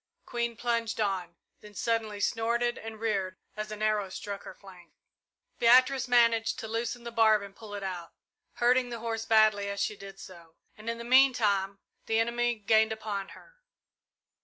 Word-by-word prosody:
Queen 235 -1 -2
plunged 230 -1 -1
on, 190 -5 -1 0.2
then 210 -1 -15
suddenly 220 -1 -1
snorted 235 +3 0
and 220 0 -9
reared 195 -4 -1 0.2
as 215 0 -5
an 215 0 -5
arrow 210 -2 +1
struck 200 +1 -6
her - - -10
flank. 185 -3 -16 0.7
Beatrice 255 +3 +5
managed 230 -2 +3
to 220 - -6
loosen 235 +2 -3
the 235 - -6
barb 220 -2 +4
and 200 0 -11
pull 210 -1 -9
it 200 - -6
out, 180 -3 -5 0.4
hurting 250 +1 +2
the 235 - -5
horse 225 0 -4
badly 215 -2 +4
as 200 0 -4
she 210 - -1
did 195 -1 -11
so, 170 -4 -13 0.2
and 215 +2 -7
in 230 - -2
the 235 - -7
meantime 230 -7 +3 0.3
the 225 0 +2
enemy 240 +1 +1
gained 220 +1 +3
upon 210 -3 -4
her. - - -19
220 Hz, 170 wpm, -29 LUFS, 200-235 Hz, 0.7 s, Beatrice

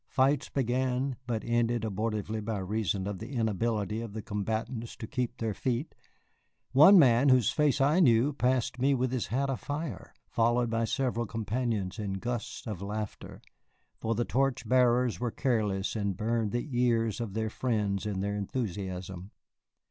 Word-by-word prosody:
Fights 135 +1 +2
began, 130 +1 0
but 115 -4 -2
ended 120 -1 +1
abortively 110 0 -2
by 110 0 -2
reason 100 0 -1
of 100 -2 -4
the 110 - -7
inability 110 -1 -1
of 115 -3 -7
the 110 -1 -5
combatants 110 +3 -3
to - - -7
keep 125 +2 -3
their 110 -2 -2
feet; 125 - -2 0.8
one 155 +9 +8
man 130 -3 +6
whose 125 -4 +4
face 150 -2 +2
I 145 +6 +4
knew 130 -2 +4
passed 125 -2 0
me 135 +2 +3
with 130 -1 0
his 130 -3 -1
hat 135 +4 0
afire, 145 +4 -4 0.2
followed 120 +1 +1
by 115 0 +1
several 120 -2 -1
companions 110 -3 -2
in 100 -2 -2
gusts 120 +4 -4
of 105 -5 -5
laughter, 105 +1 -6 0.6
for 115 0 -1
the 120 - 0
torch 135 -3 0
bearers 125 -1 +3
were 120 0 -1
careless 110 -6 0
and 100 -4 -1
burned 115 -1 0
the 120 +6 -2
ears 120 -2 +1
of 105 -4 -5
their 110 -1 -1
friends 105 -5 -1
in 100 -2 -2
their 100 +1 -1
enthusiasm. 95 -4 -4
115 Hz, 160 wpm, -29 LUFS, 105-125 Hz, 0.8 s, one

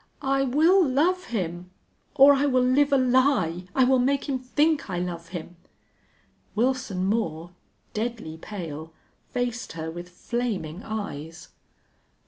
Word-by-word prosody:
I 270 0 +2
will 325 +9 +4
love 330 +6 +1
him 180 -5 -4 0.5
or 275 +1 +8
I 280 +1 +2
will 255 -2 +3
live 280 +3 +3
a 275 - +5
lie! 255 - +2
I 265 - +5
will 260 0 +4
make 275 +2 +1
him 270 -2 -1
think 290 +2 +1
I 180 - -2
love 175 -1 -4
him!" 175 0 -8 1.0
Wilson 235 -5 0
Moore, 185 -6 -1 0.4
deadly 220 -8 -4
pale, 160 -4 -7 0.4
faced 245 0 -3
her 160 0 -5
with 175 +1 -8
flaming 195 -4 -3
eyes. 165 -8 -6
235 Hz, 130 wpm, -25 LUFS, 175-265 Hz, 1.0 s, or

